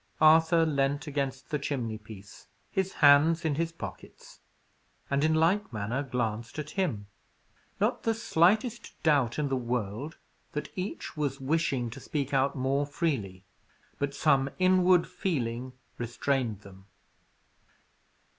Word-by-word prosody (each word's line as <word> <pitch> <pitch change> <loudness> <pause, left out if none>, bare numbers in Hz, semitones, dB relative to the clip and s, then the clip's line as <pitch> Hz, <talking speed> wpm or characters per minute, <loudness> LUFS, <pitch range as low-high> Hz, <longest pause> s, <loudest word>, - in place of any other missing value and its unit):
Arthur 160 +1 +6
leaned 140 -1 0
against 135 -2 -3
the 150 - 0
chimneypiece, 110 -7 -6 0.2
his 190 0 0
hands 155 +4 +6
in 155 - +2
his 165 +3 -1
pockets, 165 - -10 0.7
and, 140 +1 +2
in 160 0 +3
like 185 +6 +2
manner, 110 +4 -2
glanced 115 -3 -3
at 150 -1 -5
him. 150 - -1 0.7
Not - - +1
the 225 -1 0
slightest 220 +3 +1
doubt 140 -7 +3
in 150 -2 0
the 135 - +1
world 120 +3 -3 0.4
that 150 - -5
each 185 +2 -5
was 145 -2 -2
wishing 135 -4 0
to - - -8
speak 140 -2 -3
out 135 +1 +2
more 135 +2 0
freely. 115 - -2 0.6
But 140 0 -2
some 140 -3 +3
inward 185 -1 +4
feeling 125 -7 -3 0.3
restrained 120 -2 -1
them. 95 -1 -15
140 Hz, 125 wpm, -29 LUFS, 120-160 Hz, 0.7 s, Arthur